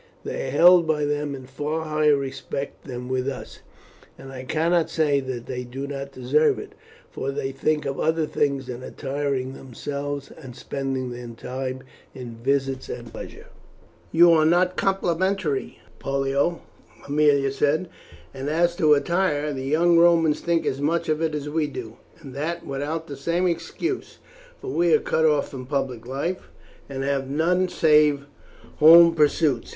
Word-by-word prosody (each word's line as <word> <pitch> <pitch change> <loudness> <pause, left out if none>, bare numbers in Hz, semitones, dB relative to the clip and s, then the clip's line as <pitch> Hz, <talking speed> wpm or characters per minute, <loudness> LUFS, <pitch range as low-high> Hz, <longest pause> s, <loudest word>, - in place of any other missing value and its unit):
They - - -4
are - - -3
held 170 +4 +6
by 150 -2 +1
them 145 -1 -2
in 130 -1 -10
far 150 +5 -3
higher 155 -1 +3
respect 140 0 -5
than 125 -1 -6
with 130 0 -1
us, 135 - -8 0.6
and 135 - -11
I 130 -1 -8
cannot 165 +3 +1
say 150 -3 +2
that 130 -3 -5
they 125 -1 -4
do 130 +3 -6
not 140 0 -6
deserve 135 +4 +2
it, - - -9 0.4
for 135 - -4
they 135 -1 -3
think 150 +3 -1
of 135 0 -3
other 160 0 +1
things 140 -3 -1
than 125 -1 -7
attiring 135 -1 -3
themselves 140 +2 -6
and 130 -6 -11
spending 135 -2 -4
their 120 0 -7
time 130 +2 -5 0.3
in 125 -3 -8
visits 135 +2 -1
and - - -7
pleasure." - - -9 0.7
"You 170 +1 +7
are 160 -2 +5
not 180 +3 +3
complimentary, 185 -5 0 0.2
Pollio," 140 +4 0 0.4
Aemilia 140 -2 +2
said; 150 +6 +1 0.5
"and 135 +1 -4
as 170 +2 +2
to 155 -5 +5
attire, 150 -2 0
the 130 -1 -5
young 165 +4 +4
Romans 165 -3 +4
think 170 -1 0
as 135 - -2
much 165 +3 0
of 155 0 0
it 160 -2 0
as 150 -1 -4
we 150 0 0
do, 115 -5 -8 0.2
and 135 - -10
that 155 +5 -4
without 145 +4 -3
the 145 - -7
same 170 +6 -1
excuse, 180 - -3 0.4
for 400 - -6
we 170 -2 +3
are - - +3
cut 160 - 0
off 150 -2 +2
from 130 -2 -8
public 130 -4 -3
life, 145 +8 -3 0.4
and 135 -1 -4
have 135 -1 -1
none 180 +5 +1
save 150 -4 +3 0.5
home 165 +2 +8
pursuits. 150 -5 +2
145 Hz, 165 wpm, -24 LUFS, 135-160 Hz, 0.7 s, home